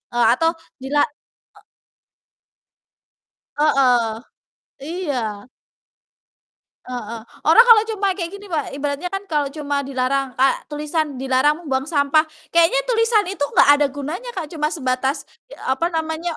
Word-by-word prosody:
eee, 240 -1 +3
atau 325 +6 +2 0.3
dila 290 +2 +1 0.6
e - - -17 2.0
Heeh, 250 -7 +3 0.8
iya. 250 - -3 1.4
Heeh, 235 -2 -6 0.3
orang 465 - +8
kalau 455 -3 +8
cuma 400 -1 0
kayak 345 -3 -4
gini 405 +1 -12
Mbak, 320 -7 -2
ibaratnya 285 +4 -3
kan 390 +1 -4
kalau 295 -5 0
cuma 285 -1 -2
dilarang 270 0 -2
kayak 270 +1 +3
tulisan, 300 -1 -2
"Dilarang 270 +5 +1
membuang 265 -2 -1
sampah," 290 -1 +3 0.3
kayaknya 340 +9 +4
tulisan 455 -3 +2
itu 365 -5 -4
enggak - - +5
ada 290 - +4
gunanya 305 - -6
Kak 355 -4 -3
cuma 300 -2 -1
sebatas 265 -2 -1 0.3
i - - -9
apa 265 +6 +1
namanya, 320 0 -3
295 Hz, 130 wpm, -20 LUFS, 265-340 Hz, 2.0 s, orang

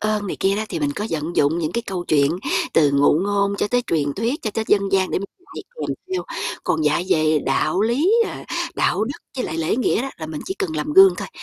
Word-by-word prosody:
ơn 215 -1 -1
này - - -4
kia 195 +1 +2
đó, 215 - -1
thì 170 - -3
mình 145 -1 0
có 210 +8 -4
vận 160 +2 -3
dụng 150 +4 +3
những 160 -1 -2
cái 235 - -1
câu 185 -3 -4
chuyện 140 -2 +3 0.4
từ 145 -3 +4
ngụ 145 +2 +4
ngôn 200 0 +1
cho 205 - 0
tới 245 0 +1
truyền 145 -3 0
thuyết 240 +9 -1
cho 215 - -2
tới 220 +2 -2
dân 200 - +4
gian 190 -1 +2
để - - 0
mình 195 - -6 0.3
dạy - - -5 0.2
kèm - - -2 0.2
theo. 370 - -1 0.4
Còn 160 - 0
dạy 160 +4 +1
về 155 -1 +3
đạo 135 +7 +1
lý, 260 - +2 0.2
ờ, - - -8 0.3
đạo 200 +5 +1
đức 270 +5 -6 0.2
với 255 - -1
lại 160 - -4
lễ 165 +7 0
nghĩa 250 -2 +1
đó, 270 - -4
là 160 - -5
mình 155 -1 -6
chỉ 380 - -4
cần 355 -6 -2
làm 300 - -2
gương 385 0 +8
thôi, - - -5
195 Hz, 255 wpm, -21 LUFS, 155-230 Hz, 0.4 s, gương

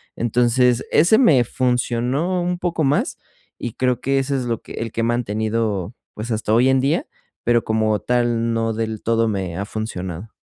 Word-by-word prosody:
Entonces, 120 +1 +2
ese 175 +8 +5
me 150 - +5
funcionó 125 +8 0
un 180 0 -1
poco 170 -3 -1
más 140 +1 +1 0.4
y 120 - -4
creo 125 -1 0
que 135 +1 +1
ese 135 +1 -1
es, 130 - -3
lo 115 -2 -2
que - - -11
el 115 -1 -4
que 115 - -2
he - - 0
mantenido, 110 -3 -1 0.2
pues, 110 +3 -5
hasta 110 -1 -1
hoy 120 +3 +4
en 135 0 +3
día, 155 - +1 0.4
pero 120 -1 +2
como 110 -1 +1
tal 120 -1 +1
no 115 0 0
del 110 -1 -3
todo 115 0 +2
me 95 -5 -3
ha 100 - -3
funcionado. 100 -3 -5
120 Hz, 185 wpm, -21 LUFS, 110-130 Hz, 0.4 s, ese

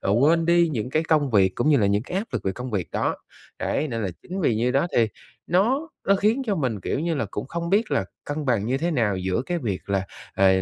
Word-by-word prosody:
ờ, 95 - -1
quên 165 +3 +4
đi 170 0 +4
những 125 -1 -3
cái 155 - +1
công 150 -4 +2
việc 95 -4 +3
cũng 120 - +1
như 145 - +6
là 105 - +3
những 100 +1 +2
cái 180 +9 -3
áp 220 - -3
lực - - -3
về 95 - 0
công 125 +4 -6
việc 95 -5 -2
đó. - - 0 0.4
Đấy, 155 - -1
nên 115 -3 -3
là 100 - -1
chính 190 +2 -5
vì 120 -9 +2
như 120 +3 +1
đó 140 +6 +2
thì 115 -2 +4 0.4
nó 245 - +2 0.2
nó 200 - +5
khiến 220 +7 +2
cho 205 - +1
mình, 125 -9 -1
kiểu 110 - -2
như 165 +1 0
là, 125 -8 -1
cũng 105 +4 -4
không 170 +1 -3
biết 215 +2 +2
là - - +1 0.2
cân 145 +1 -3
bằng 115 -5 +1
như 130 +3 0
thế 170 +2 0
nào 110 - +1
giữa 95 +5 -1
cái 175 -1 -1
việc 105 - -4
là, 95 -1 0 0.3
ờ, 95 0 +4
135 Hz, 270 wpm, -24 LUFS, 105-170 Hz, 0.4 s, như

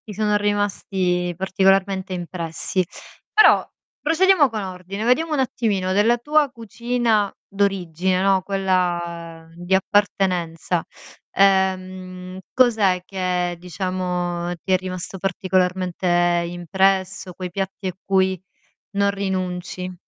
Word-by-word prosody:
Ti 210 - -6
sono 210 +1 +1
rimasti 195 -3 0
particolarmente 190 0 +1
impressi. 175 +1 -3 0.5
Però 430 - +6 0.3
procediamo 325 -1 +4
con 220 -3 -4
ordine, 185 +2 -6
vediamo 305 +7 +2
un 295 - +1
attimino: 205 -7 0
della 220 +5 +4
tua 295 +4 +2
cucina 235 -2 0 0.2
d'origine, 185 -2 0
no, 195 -1 +3
quella 175 -4 -2
di 175 +2 0
appartenenza, 180 -4 0 0.5
ehm, 185 -1 0
cos'è 220 -8 +3
che, 180 -2 -1
diciamo, 180 0 -3
ti 190 - -3
è 185 - +5
rimasto 185 0 -6
particolarmente 185 -1 0 0.4
impresso, 190 +2 0
quei 180 0 -6
piatti 195 +1 -4
a 185 - -3
cui 190 -2 +1 0.6
non 200 0 +3
rinunci? 185 -2 -3
190 Hz, 105 wpm, -22 LUFS, 180-200 Hz, 0.6 s, Però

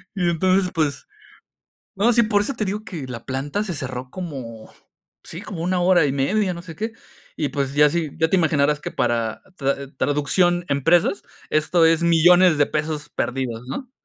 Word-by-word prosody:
Y 180 -3 +1
entonces, 185 +2 +2
pues 155 -4 -1 0.9
No, 215 +5 +3
sí, 235 0 +4
por 215 -2 +2
eso 240 +7 -2
te 225 - -2
digo 210 +2 -4
que 165 -10 -7
la 120 -3 -8
planta 145 +10 -2
se 185 -5 -4
cerró 130 -3 -5
como, 130 -11 -8 0.5
sí, 170 - -8
como 190 -6 -6
1 180 +1 0
hora 175 -3 +4
y 135 - -1
media, 185 +8 0
no 170 - -8
sé 170 -2 -10
qué. 220 +6 -3 0.4
Y 150 - -1
pues 140 0 -3
ya 150 0 +5
si 165 -1 -2
ya 160 0 +2
te 190 - +2
imaginarás 150 -3 +2
que - - -5
para 115 -2 -1
tra 140 -1 -2
traducción 175 +5 +1
empresas, 165 +7 +2 0.3
esto 160 +2 +2
es 165 0 +3
millones 170 +1 +5
de 145 - +4
pesos 150 -1 -3
perdidos, 125 -2 -3
¿no? 245 - -6
160 Hz, 185 wpm, -22 LUFS, 140-185 Hz, 0.9 s, ya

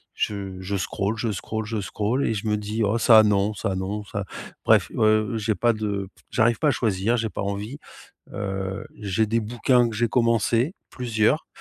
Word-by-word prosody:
je 100 -3 -3
je 95 +2 -3
scroll, 100 +3 -2
je 115 0 -1
scroll, 110 +2 -4
je 110 0 -3
scroll, 110 +7 -1
et - - +1
je 105 +1 -4
me 105 0 +1
dis: 105 +2 -2
«Oh 105 +3 +1
ça 110 -2 +7
non, 105 0 +2
ça 95 -1 -2
non, 100 +3 -3
ça» 100 -1 -4 0.4
bref, - - +4
heu, 110 0 +3
j'ai 110 0 0
pas 120 +6 +3
de 100 -3 -3 0.2
j'arrive 115 0 +3
pas 155 - +3
à - - +4
choisir, 110 -1 +1
j'ai 110 -1 -1
pas 90 - -5
envie. 100 +6 -4 0.6
Heu, 95 -1 -4
j'ai 105 +1 0
des 115 +2 +1
bouquins 120 +2 +2
que - - -7
j'ai 120 +2 +1
commencé, 115 - +2 0.2
plusieurs, 120 +3 0
110 Hz, 190 wpm, -24 LUFS, 100-115 Hz, 0.6 s, ça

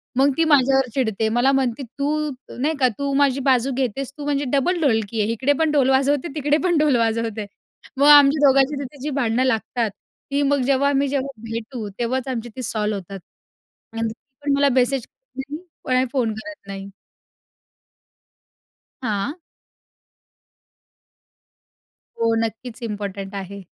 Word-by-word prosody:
मग 270 +2 +4
ती 330 - +4
माझ्यावर 270 -3 +4
चिडते, 220 -5 0
मला 240 +4 +3
म्हणते, 270 -1 0
"तू 290 +4 -2 0.3
नाही 295 +5 +1
का 255 - +5
तू 280 0 -2
माझी 275 -1 +3
बाजू 255 +1 +3
घेतेस, 260 +1 -2
तू 290 - -6
म्हणजे 290 0 0
डबल 345 +6 +2
ढोलकी 225 -5 +1
आहे 210 - 0
इकडे 260 +5 +1
पण 320 -1 +2
ढोल 275 -3 +3
वाजवते, 275 +3 +2
तिकडे 295 0 +2
पण 350 -3 +2
ढोल 300 -3 +3
वाजवते." 225 -2 -1 0.5
मग 280 +2 +4
आमच्या 290 0 +7
दोघांची 270 +2 +4
तिथे 275 +1 -8
जी 295 - -2
भांडणं 245 -2 +1
लागतात 230 -1 0 0.4
ती, 280 - +1
मग 285 -1 +2
जेव्हा 275 +1 +3
आम्ही 280 0 +2
जेव्हा 270 -4 -3
भेटू 230 0 -5
तेव्हाच 255 +2 -1
आमची 240 -2 -3
ती 260 - -5
सॉल्व 215 -2 -1
होतात 195 0 -7 0.8
आणि 225 0 0 0.4
पण 285 - +1
मला 280 0 +3
मेसेज 255 0 +1 0.3
नाही 280 +3 -5 0.3
कोणाला 255 0 +2
फोन 245 -5 0
करत 255 +2 -10
नाही. 195 0 -7 2.1
हां. 215 +1 -1 2.9
हो. 230 0 +3
नक्कीच 225 +2 -6
इम्पोर्टंट 200 -2 -5
आहे. 200 0 -7
260 Hz, 145 wpm, -22 LUFS, 225-280 Hz, 2.9 s, आमच्या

